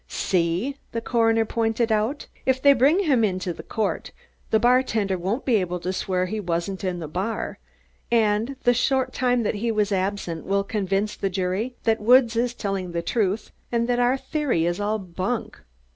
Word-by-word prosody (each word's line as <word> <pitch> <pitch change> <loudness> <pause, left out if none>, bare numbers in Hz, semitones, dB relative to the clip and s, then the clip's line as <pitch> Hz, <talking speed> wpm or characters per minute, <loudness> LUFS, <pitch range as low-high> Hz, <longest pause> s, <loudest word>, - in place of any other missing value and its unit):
"See!" 185 +10 0 0.2
the 230 - -1
coroner 225 -1 +2
pointed 225 +1 0
out. 220 +7 0 0.2
"If 260 0 +2
they 280 +1 +6
bring 280 +9 +4
him 265 -9 +3
into 185 -3 -1
court, 220 -2 -2 0.4
the 220 - +3
bartender 230 -5 +2
won't 190 +9 -2
be 245 -4 +3
able 180 -2 -2
to 180 +2 -3
swear 185 -1 -1
he 215 +4 -3
wasn't 180 +1 -3
in 185 -2 -1
the 165 -3 -5
bar 190 +9 -3 0.5
and 225 +2 +2
the 245 - +5
short 260 +2 +1
time 245 -1 +1
that - - 0
he 225 +3 -1
was 210 -1 0
absent 190 -4 -2
will 200 +1 +1
convince 200 0 -1
the 195 - -2
jury 190 +6 -2
that 225 -1 +1
Woods 240 +1 +5
is 240 +1 0
telling 195 -5 -3
the 170 0 -2
truth 210 0 -1 0.2
and 235 -1 +1
that 245 0 +1
our 245 +2 +3
theory 270 - -1
is 175 +2 -1
all 210 +1 0
bunk." 190 +4 -4
215 Hz, 180 wpm, -24 LUFS, 190-240 Hz, 0.5 s, they